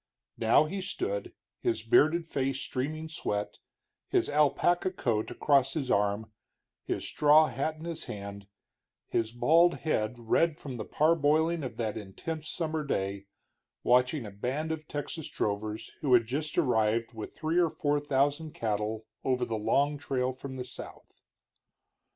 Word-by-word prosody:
Now 115 +7 +5
he 190 +5 -4
stood, 435 - -3 0.3
his 355 -2 -1
bearded 170 - +4
face 135 -4 -1
streaming 155 +5 -3
sweat, 105 -10 -3 0.5
his - - +1
alpaca 150 +5 +3
coat 115 - -1
across 135 -2 +2
his 135 -5 -1
arm, 105 +2 +1 0.5
his - - -2
straw 150 +1 +5
hat 140 +5 -2
in 155 +1 -10
his 170 -2 -5
hand, 100 -1 -7 0.6
his 115 -1 0
bald 165 +8 +4
head 110 -6 0
red 150 +7 +2
from 130 -4 -7
the 110 - -5
parboiling 160 +1 +2
of 130 - -5
that 110 -3 -2
intense 150 - -6
summer 160 -2 -2
day, 100 -7 -2 0.6
watching 125 +2 +3
a 105 - -7
band 130 +10 -2
of 155 -1 -5
Texas 145 +2 -5
drovers 105 +2 -3
who 135 -4 +5
had 115 -2 +4
just 145 +6 -3
arrived 115 -6 +2
with 110 -2 -8
three 160 +2 +1
or 170 -2 +4
four 145 -1 0
thousand 145 +2 0
cattle 110 0 -2 0.2
over 125 -1 +1
the 115 - -3
long 140 +7 +1
trail 130 -2 -1
from 130 +1 -8
the 125 -1 -5
south. - - -11
135 Hz, 150 wpm, -30 LUFS, 110-155 Hz, 0.6 s, Now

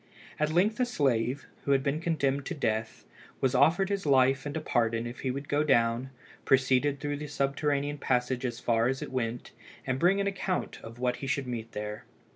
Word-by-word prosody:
At 150 0 +2
length 200 +8 +2
a 250 - +3
slave, 135 - 0 0.2
who 140 - +2
had 135 -1 +2
been 145 +3 -1
condemned 140 -4 0
to 175 - -3
death, 110 -5 -2 0.3
was 130 -2 +1
offered 165 +9 +4
his 200 -1 -1
life 135 -1 +3
and 145 +2 -3
a - - 0
pardon 115 -5 0
if 120 +1 -7
he 130 - -2
would 140 +2 -4
go 145 +1 +2
down, 120 -2 +2 0.3
proceed 135 +1 +3
through 145 0 -2
the 150 +1 -6
subterranean 145 +1 -1
passage 125 0 0
as 120 -2 -3
far 115 -1 +2
as 135 +1 -1
it - - -7
went, 120 -2 -3 0.3
and 130 0 -1
bring 185 +5 +4
an 200 - +1
account 195 -1 -2
of 115 +1 -10
what 125 0 0
he 135 - -6
should 140 +1 -1
meet 115 -2 -5
there. 105 0 -5
135 Hz, 205 wpm, -29 LUFS, 125-150 Hz, 0.3 s, offered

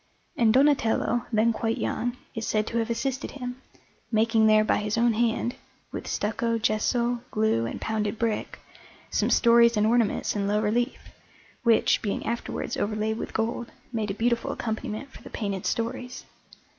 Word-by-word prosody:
And 230 -2 +4
Donatello, 245 -3 +2
then 225 +1 +3
quite 225 +1 -1
young, 245 +1 -2 0.2
is 225 -3 -4
said 215 -1 +1
to 235 +1 -1
have 225 0 -1
assisted 265 +4 -2
him, 250 -1 -7 0.5
making 220 0 +3
there 215 0 +6
by - - +2
his 210 +1 -2
own 235 0 +3
hand, 235 +1 0 0.4
with - - -6
stucco, 225 +2 -1
gesso, 235 +2 +1
glue, 215 - +1
and - - -5
pounded 215 -1 -2
brick, 225 -2 -2 0.5
some - - +1
stories 235 -1 +5
and 210 - +3
ornaments 230 -2 +1
in 200 -1 0
low 210 +1 +2
relief, 235 +4 -1 0.5
which, 230 -2 +3
being 205 - -2
afterwards 235 0 -3
overlaid 215 +1 -1
with - - -5
gold, 230 +1 -2 0.2
made 220 -2 -1
a 195 - -2
beautiful 235 +1 0
accompaniment 220 +3 -4
for - - -13
the - - -11
painted 200 -4 -3
stories. 250 +2 -3
225 Hz, 160 wpm, -26 LUFS, 215-235 Hz, 0.5 s, there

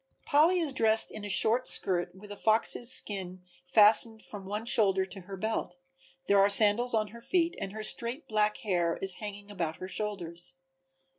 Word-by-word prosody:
Polly 320 +6 +3
is 310 -5 -1
dressed 225 -3 +1
in 215 - -9
a 205 - -6
short 230 +5 +2
skirt 175 -1 0
with 205 +2 -14
a - - -7
fox's 225 +3 +1
skin 185 -6 +1 0.2
fastened 220 +2 +3
from 195 -2 -10
one 210 +3 -5
shoulder 195 -5 +2
to 190 +1 -10
her 195 +2 -10
belt, 215 -3 -4 0.5
there 200 0 +3
are 200 +1 +4
sandals 220 +4 +3
on 215 -1 -1
her 235 +3 -13
feet 345 +5 -1
and 195 - -5
her 215 +1 -7
straight 240 +7 +2
black 210 -1 0
hair 175 -8 -2
is 195 -1 -3
hanging 205 -1 -8
about 165 -5 -4
her 185 - -9
shoulders. 180 -1 -5
210 Hz, 180 wpm, -28 LUFS, 190-225 Hz, 0.5 s, are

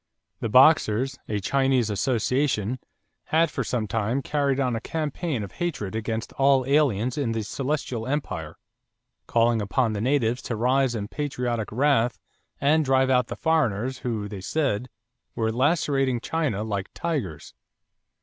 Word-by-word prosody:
The 115 - -2
Boxers, 130 -1 +4
a 105 -1 0
Chinese 130 0 +1
association, 125 +1 0 0.5
had 165 0 +2
for 135 - -2
some 115 -2 -2
time 115 +5 -1
carried 140 -2 0
on 125 -3 +1
a 115 - -3
campaign 155 - -3
of 100 - -7
hatred 135 - -3
against 110 +1 -3
all 135 -1 +4
aliens 130 -3 +2
in 120 -5 0
the 110 -1 -2
Celestial 130 0 -3
empire, 105 - -3 0.7
calling 115 -1 +2
upon 110 +3 0
the 105 - -3
natives 125 -1 +1
to 115 - -4
rise 125 +2 +2
in 105 -2 -3
patriotic 125 -5 -3
wrath 125 -1 +2 0.4
and 155 +3 +3
drive 130 -1 +3
out 125 -2 +3
the - - -5
foreigners 130 -6 0
who, 110 -4 -3
they 100 -2 -7
said, 125 +1 -1 0.5
"were 110 -1 0
lacerating 135 -1 +1
China 145 -8 -1
like 100 -3 -3
tigers." 135 - -3
125 Hz, 145 wpm, -25 LUFS, 110-140 Hz, 0.7 s, Boxers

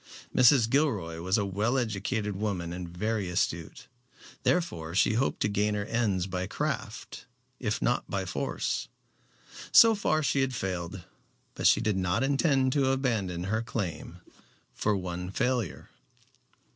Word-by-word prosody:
Mrs. 125 -2 +6
Gilroy 105 - 0
was 95 +4 +1
a 100 - 0
well 105 +7 0
educated 105 -2 -1
woman 95 -4 -2
and 90 -1 -6
very 105 +2 -2
astute, 85 +7 -2 0.6
therefore 85 - 0
she 105 - +4
hoped 120 +5 0
to - - +3
gain 105 +1 0
her 100 0 -2
ends 105 -6 0
by 95 -1 -3
craft 125 -2 -4 0.3
if 110 -4 -2
not 120 - 0
by 100 -1 -2
force. 90 - -2 0.8
So 230 -1 +8
far 155 -7 +1
she 140 -1 +2
had 130 -1 0
failed, 90 -3 -4 0.5
but - - +2
she - - +5
did 105 -4 0
not 95 +6 +1
intend 135 -2 +2
to 135 -2 +2
abandon 110 -10 -1
her 110 +4 -1
claim 110 -7 -5 0.5
for 105 -1 0
one 90 -1 -4
failure. 120 -2 -2
105 Hz, 145 wpm, -28 LUFS, 90-125 Hz, 0.8 s, So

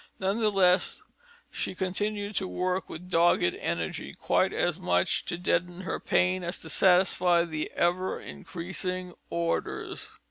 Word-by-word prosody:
None 195 +2 0
the 220 -2 +3
less, 185 -2 +2 0.5
she - - -3
continued 205 +2 -2
to 190 - 0
work 185 +1 -1
with 175 +3 -8
dogged 175 -1 +4 0.2
energy, 85 -1 -3
quite - - +2
as - - 0
much 90 0 +1
to 175 - -3
deaden 175 0 0
her 190 - -3
pain 185 0 +2
as 175 +2 -2
to - - -6
satisfy 180 -2 +4
the 155 -2 -3
ever 180 +2 +1
increasing 180 0 -5 0.2
orders. 170 0 -2
180 Hz, 140 wpm, -28 LUFS, 175-190 Hz, 0.5 s, dogged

